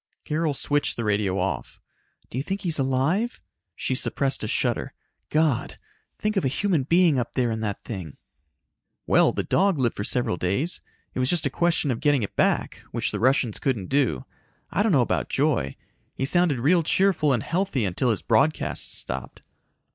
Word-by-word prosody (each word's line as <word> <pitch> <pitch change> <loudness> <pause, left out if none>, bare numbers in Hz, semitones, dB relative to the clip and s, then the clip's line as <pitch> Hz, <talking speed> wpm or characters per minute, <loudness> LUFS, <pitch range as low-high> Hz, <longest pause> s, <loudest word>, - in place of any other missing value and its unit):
Carol 155 -1 0
switched 145 +2 0
the 120 - -2
radio 100 -3 0
off. 80 -10 -3 0.5
"Do 125 - -3
you - - -2
think 195 +5 -3
he's 165 -5 -1
alive?" 140 - 0 0.4
She - - -2
suppressed 135 +1 -1
a - - -1
shudder. - - -1 0.3
"God! 155 -5 +1 0.4
Think 215 0 -1
of 195 - +1
a - - +2
human 170 +4 +1
being 165 0 +3
up 120 - -4
there 125 -3 +1
in 110 - -2
that 105 -3 -4
thing." 95 - -7 0.9
"Well, - - +4
the - - -2
dog 195 -2 +2
lived 125 -4 0
for 105 - -3
several 120 -5 0
days. 100 - -1 0.3
It - - -4
was 130 0 +1
just 175 -3 +1
a 140 - 0
question 165 -2 +1
of 115 - -2
getting 145 -5 +3
it 100 - -5
back, - - +1
which - - -1
the 105 - -3
Russians 125 -2 +2
couldn't 115 -9 -1
do. 135 - +1 0.5
I 195 - +1
don't 215 0 +2
know 140 -7 +5
about 120 - -1
Joy. 135 - 0 0.4
He 135 - -1
sounded 175 -1 +3
real 160 +9 +3
cheerful 165 -2 +2
and 120 -5 +1
healthy 170 - 0
until 95 +7 0
his 110 - 0
broadcasts 130 +7 +1
stopped." 65 +1 -6
135 Hz, 185 wpm, -25 LUFS, 110-165 Hz, 0.9 s, know